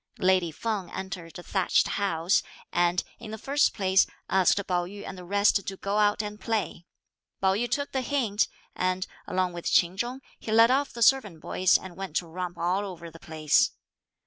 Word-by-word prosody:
Lady 185 -2 +3
Feng 200 +2 -3
entered 180 -3 -6
a 175 - -9
thatched 190 0 +2
house, 180 -3 +1 0.3
and, 175 0 +2 0.2
in 230 - -9
the 220 - -5
first 280 +6 +2
place, 190 -1 +3 0.2
asked 190 -1 +4
Pao 175 -1 0
yü 200 +2 -9
and 190 - -6
the 180 - -10
rest 200 +2 +3
to 195 - -4
go 200 +2 -1
out 210 0 +3
and 210 0 -7
play. 215 -6 -2 0.5
Pao 190 0 +3
yü 240 +5 -1
took 285 0 -1
the 265 - -1
hint, 240 -6 +1 0.3
and, 185 0 0 0.2
along 185 -1 0
with 175 -1 -3
Ch'in 175 +1 +4
Chung, 245 +5 -3 0.2
he 220 - -6
led 230 +2 +6
off 275 +2 +1
the 235 - -1
servant 215 -10 +3
boys 185 +3 +3
and 185 -2 -10
went 190 -4 -7
to 175 - +1
romp 175 +1 -5
all 180 +4 0
over 170 -4 -8
the 165 - -13
place. 155 -3 +2
190 Hz, 195 wpm, -27 LUFS, 175-215 Hz, 0.5 s, led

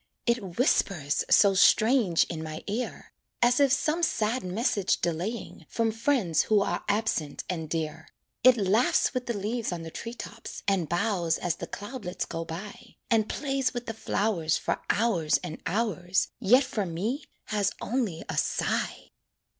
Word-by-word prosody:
It 215 -8 -1
whispers 175 - +2
so 200 -1 +6
strange 215 -1 +4
in 165 -2 -5
my 155 0 -6
ear, 225 +5 -4 0.3
As 245 +2 +4
if 280 -2 +4
some 305 +4 +1
sad 240 -6 +1
message 200 +1 0
delaying, 175 +8 -3
From 225 -1 0
friends 225 - +1
who 215 -2 +3
are - - -1
absent 205 -9 0
and 160 -4 -4
dear. 160 -1 -3 0.4
It 255 0 +7
laughs 210 +7 +2
with 255 -1 -3
the 235 -3 -1
leaves 220 +3 -2
on 170 -2 -4
the 165 - -7
tree 230 +7 -6
tops, 230 0 -8
And 190 -5 +1
bows 175 -2 +1
as 175 -2 -2
the - - -6
cloudlets 205 -4 -5
go 165 - -4
by, 170 +6 -9 0.2
And 220 -2 +3
plays 270 -3 -1
with 245 0 -4
the 225 - -4
flowers 200 -7 0
For - - -2
hours 195 -9 +2
and 165 -3 -6
hours, 190 -2 0
Yet 250 +5 +5
for 230 -7 -2
me 215 - -3 0.2
has 205 -2 +1
only 225 -9 -2
a 155 - -4
sigh. - - -1
205 Hz, 160 wpm, -28 LUFS, 175-235 Hz, 0.4 s, It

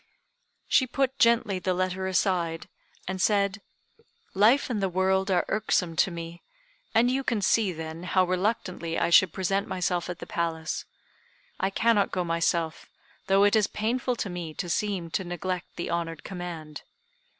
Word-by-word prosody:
She 260 - +3
put 270 +1 -1
gently 230 -6 +3
the 185 0 -1
letter 185 +1 -1
aside, 175 -3 0 0.4
and 190 0 -3
said, 200 0 +2 0.7
"Life 220 +8 +4
and 225 -5 -2
the 195 - +1
world 190 +2 +1
are 185 -2 +2
irksome 185 -5 0
to - - +4
me; 170 0 -7 0.5
and 240 +2 +4
you 270 +1 0
can 230 -4 0
see, 205 0 +2
then, 160 0 -7
how 185 0 +3
reluctantly 185 -3 -1
I - - +1
should 185 - +6
present 195 +1 -1
myself 180 -1 -1
at 175 - -4
the - - -8
Palace. 165 -1 -3 0.7
I 190 - +1
cannot 215 0 +2
go 185 - -1
myself, 165 -1 -1 0.4
though 195 +1 +4
it 205 +2 +4
is 215 -2 +3
painful 245 +3 -1
to 220 - -3
me 170 -3 -6
to 180 - -4
seem 185 -3 -1
to 190 - -1
neglect 175 0 -4
the 170 - -4
honored 165 -2 -3
command. 170 -5 -7
185 Hz, 160 wpm, -27 LUFS, 170-205 Hz, 0.7 s, should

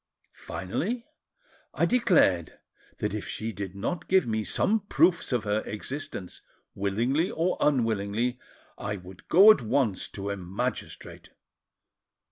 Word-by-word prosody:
Finally, 210 - -3 0.7
I - - +3
declared 175 - +3 0.4
that - - -2
if - - -4
she 110 +1 -3
did 100 -3 -6
not 135 - -3
give 190 0 +4
me 110 -2 -1
some 220 - +1
proofs 185 -5 +2
of 120 -4 +1
her 105 0 +1
existence, 105 - -6 0.3
willingly 115 - 0
or 170 +3 0
unwillingly, 115 -2 +1 0.4
I 100 +1 -3
would 90 -1 -12
go 195 +6 +9
at 185 - +2
once 110 -3 0
to 100 0 -5
a 100 - -3
magistrate. 100 +8 -5
115 Hz, 125 wpm, -27 LUFS, 100-165 Hz, 0.7 s, go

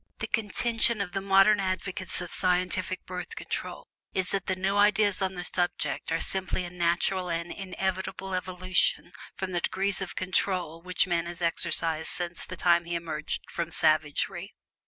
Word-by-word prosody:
The - - -3
contention 230 +1 +2
of 200 -3 -2
the 195 +1 -2
modern 195 +2 +5
advocates 185 -1 -2
of 175 - -5
scientific 185 0 +1
Birth 180 0 -6
Control - - -5 0.3
is 185 -1 0
that 195 -1 -1
the 185 - +1
"new 190 +2 0
ideas" 205 -1 +4
on 190 0 0
the 180 - -4
subject 175 -5 -2
are 165 - +1
simply 185 0 0
a 175 - -7
natural 180 +1 +1
and 170 0 -2
inevitable 190 0 -3
evolution 185 -1 +1 0.2
from 190 -1 -4
the 175 -1 0
degrees 195 +2 0
of 190 - -5
"control" 180 -3 -1
which 180 0 +1
man 170 -2 0
has 175 0 -6
exercised 165 -1 +1
since 175 -1 -1
the 185 - -7
time 170 -1 +4
he 170 0 -3
emerged 160 -2 -3
from 170 -1 -2
savagery. 155 +5 +1
185 Hz, 165 wpm, -28 LUFS, 170-190 Hz, 0.3 s, modern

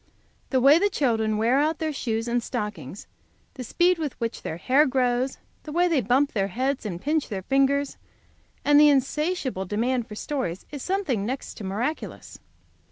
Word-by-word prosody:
The 260 - +2
way 280 +5 +6
the 405 +2 +2
children 225 - 0
wear 235 +5 +3
out 310 +2 +1
their 315 -1 -2
shoes 225 -4 -2
and 240 0 0
stockings, 205 - -5 0.5
the 255 - -7
speed 350 +7 +2
with 300 -4 -4
which 230 -1 -3
their 160 - -5
hair 265 - +3
grows, 255 0 0 0.2
the 305 - -9
way 350 +3 +3
they 320 -6 +2
bump 255 +6 +2
their 195 -3 0
heads 255 +4 -2
and 175 -4 -5
pinch 300 - -1
their 195 -4 -4
fingers, 275 +3 +1 0.7
and 290 0 +6
the 300 0 +7
insatiable 280 - 0
demand 235 +5 -1
for 210 - -9
stories, 240 - -4
is 290 -2 -6
something 365 - -1
next 255 +6 -4
to 215 - -8
miraculous. 225 +11 -4
260 Hz, 175 wpm, -25 LUFS, 220-295 Hz, 0.7 s, the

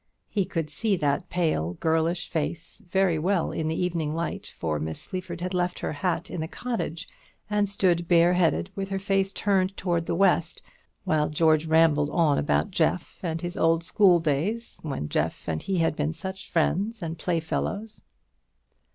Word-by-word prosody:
He 200 -3 +1
could 165 -5 -3
see 215 +4 +1
that 150 0 0
pale 155 - 0
girlish 165 +2 0
face 165 +5 -4
very 185 -3 +2
well 180 +2 +1
in 160 - -2
the 160 +1 -1
evening 165 -4 -1
light, 165 0 -4
for 80 -2 -1
Miss 80 +1 -4
Sleaford 180 -2 -6
had 180 +1 -3
left 180 0 0
her - - -3
hat 175 +4 -2
in 170 - -3
the 160 - -3
cottage, 180 -6 -4 0.4
and 205 -1 +2
stood 175 -4 +1
bareheaded, 175 +1 +3
with 195 0 -3
her 195 - -1
face 195 0 +1
turned 195 -1 +1
towards 170 -2 -1
the - - 0
west, 195 +3 +2 0.4
while 155 -5 +1
George 155 +1 +3
rambled 160 -2 +4
on 150 -3 +3
about 195 +7 +1
Jeff 170 0 0
and 165 -2 -2
his 175 0 -4
old 165 0 +2
school 180 0 +5
days, 170 +10 -1
when 135 - -4
Jeff - - -2
and 80 -1 -1
he 190 -1 -1
had 165 -2 +2
been 150 +1 -1
such 190 +3 -6
friends 200 +6 0
and 165 0 -4
playfellows. 180 +6 -2
170 Hz, 170 wpm, -26 LUFS, 160-190 Hz, 0.4 s, school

